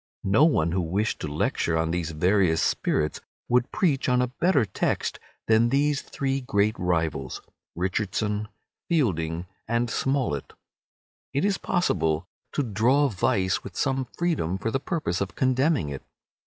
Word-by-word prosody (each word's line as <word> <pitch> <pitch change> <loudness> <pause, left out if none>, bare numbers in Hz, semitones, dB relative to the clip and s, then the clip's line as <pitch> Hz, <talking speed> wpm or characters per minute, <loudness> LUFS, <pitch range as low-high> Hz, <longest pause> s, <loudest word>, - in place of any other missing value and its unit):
No 100 +10 +5
one 85 - +2
who 90 +1 +1
wished 95 +7 -1
to - - -4
lecture 80 +2 0
on 80 0 0
these 85 -1 -1
various 90 +1 +2
spirits 75 -1 0 0.3
could 125 +1 +2
preach 160 -11 +1
on 125 0 +3
a 125 - +3
better 135 - +2
text 95 - -1 0.3
than 115 +1 +4
these 145 +2 +2
three 135 0 -2
great 105 -3 +1
rivals, 80 -7 -1 0.4
Richardson, 105 +3 -1 0.4
Fielding, 85 - 0 0.2
and 115 +1 0
Smollett. 130 - -1 0.8
It 140 +7 +1
is 200 -1 +1
possible 80 - 0 0.3
to 145 - +1
draw 125 +6 +3
vice 95 -3 +1
with 95 - -9
some 135 -2 0
freedom 155 - 0
for 110 +3 -2
the 135 - 0
purpose 145 - -2
of 100 - -3
condemning 130 - +2
it. 70 -2 -5
105 Hz, 145 wpm, -26 LUFS, 85-135 Hz, 0.8 s, No